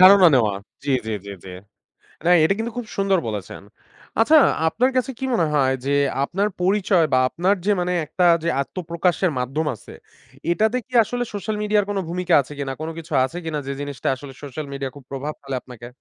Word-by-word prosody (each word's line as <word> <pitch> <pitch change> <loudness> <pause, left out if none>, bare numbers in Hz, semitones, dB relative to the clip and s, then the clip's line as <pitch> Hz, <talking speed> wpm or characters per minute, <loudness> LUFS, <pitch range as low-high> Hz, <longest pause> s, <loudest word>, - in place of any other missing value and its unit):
ধারণা 185 0 +9
নেওয়া 110 -5 +3 0.3
জি, 145 - -1 0.2
জি, 110 - -2
জি, - - -6
জি। - - -9 0.8
না 175 - +4
এটা 180 +5 +4
কিন্তু 230 +1 -2
খুব 245 - -3
সুন্দর 195 -2 +2
বলেছেন। 105 -3 -5 0.6
আচ্ছা 305 +8 +6 0.3
আপনার 250 +10 +2
কাছে 260 +1 0
কি 265 - -2
মনে 170 -8 +3
হয় 135 -2 +3
যে 140 - 0 0.3
আপনার 195 +8 0
পরিচয় 185 -3 +3
বা - - +5
আপনার 185 +5 +1
যে 210 - +3
মানে 180 0 0
একটা 175 +4 0 0.2
যে 170 - +1
আত্মপ্রকাশের 175 +2 -1
মাধ্যম 135 +6 -2
আছে, - - -14 0.6
এটাতে 220 +7 +2
কি 255 - -20
আসলে 245 +3 -3
সোশ্যাল 210 +2 -3
মিডিয়ার 210 -1 +2
কোন 205 - -1
ভূমিকা 180 +1 -1
আছে 140 - -10
কিনা? 135 -1 -3
কোন 160 - -3
কিছু 165 -1 -8
আছে 165 +6 -7
কিনা 155 -2 -2
যে 140 - -2
জিনিসটা 145 -2 -5
আসলে 135 0 -10
সোশ্যাল 145 +2 -6
মিডিয়া 135 -1 -4
খুব 140 - -12
প্রভাব 140 +3 -4
ফেলে 135 -1 -4
আপনাকে? 120 -2 -11
170 Hz, 195 wpm, -22 LUFS, 140-200 Hz, 0.8 s, ধারণা